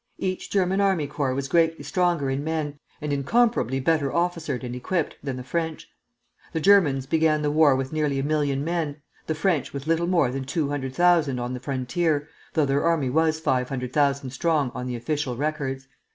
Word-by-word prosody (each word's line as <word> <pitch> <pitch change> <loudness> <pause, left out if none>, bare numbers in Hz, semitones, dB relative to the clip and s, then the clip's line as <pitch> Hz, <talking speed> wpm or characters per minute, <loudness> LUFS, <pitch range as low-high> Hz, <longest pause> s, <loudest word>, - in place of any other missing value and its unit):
Each 185 -1 -3
German 190 0 +1
army 190 -6 +2
corps 140 -2 -2
was 140 0 -2
greatly 165 -1 +2
stronger 170 -1 +1
in 135 +2 -2
men, 155 -2 -3 0.2
and 150 -1 -2
incomparably 140 - +2
better 145 0 +1
officered 165 -7 -1
and 125 0 -5
equipped, 160 +6 -2
than 135 -2 -4
the 125 - -6
French. 160 +3 -3 0.7
The 160 - 0
Germans 160 -8 +4
began 155 +1 +2
the 145 - +1
war 150 -2 +5
with 135 +2 -3
nearly 150 -3 0
a 135 - -1
million 145 -2 0
men; 160 -3 -2 0.3
the 160 - -1
French 160 -3 0
with 140 0 -5
little 165 +1 +1
more 170 -8 +2
than 135 0 -4
two 140 +1 -1
hundred 135 -2 -3
thousand 170 -7 +3
on 120 +1 -3
the 125 - -4
frontier, 145 +4 -1 0.3
though 155 - +3
their 140 +1 +1
army 160 -6 +1
was 160 +2 +2
five 125 -5 0
hundred 125 -2 -4
thousand 140 -3 +1
strong 145 -2 +1
on 125 0 -5
the 125 - -3
official 125 +1 -2
records. 135 -2 -3
145 Hz, 195 wpm, -25 LUFS, 135-165 Hz, 0.7 s, war